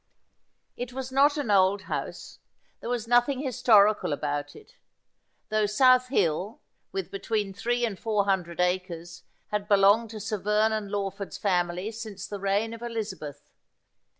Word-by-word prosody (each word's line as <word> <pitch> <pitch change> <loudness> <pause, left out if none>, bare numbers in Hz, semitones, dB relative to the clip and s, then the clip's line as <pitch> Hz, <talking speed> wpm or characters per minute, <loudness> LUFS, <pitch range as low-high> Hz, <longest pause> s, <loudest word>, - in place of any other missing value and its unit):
It 245 0 -6
was 260 0 -5
not 285 +3 +4
an 280 -8 -1
old 195 0 +3
house. - - -6 0.4
There - - -6
was 240 -2 -2
nothing 245 +3 +3
historical 220 - +3
about 145 0 -3
it; 435 +3 -16 0.8
though 215 -1 +2
South 255 +4 +4
Hill, 195 - 0 0.3
with 190 -2 -4
between 200 0 -2
three 240 +4 0
and 205 -5 -5
four 210 -3 0
hundred 180 -4 -1
acres, 180 -2 -2 0.3
had 210 -1 -2
belonged 205 +2 +4
to 220 -1 -7
Sir 215 0 -3
Vernon 210 +1 +1
Lawford's 200 -1 -4
family 180 +1 0
since 215 -4 -7
the 205 - -6
reign 200 +3 0
of 230 - -9
Elizabeth. 200 -11 -6
210 Hz, 145 wpm, -27 LUFS, 190-230 Hz, 0.8 s, not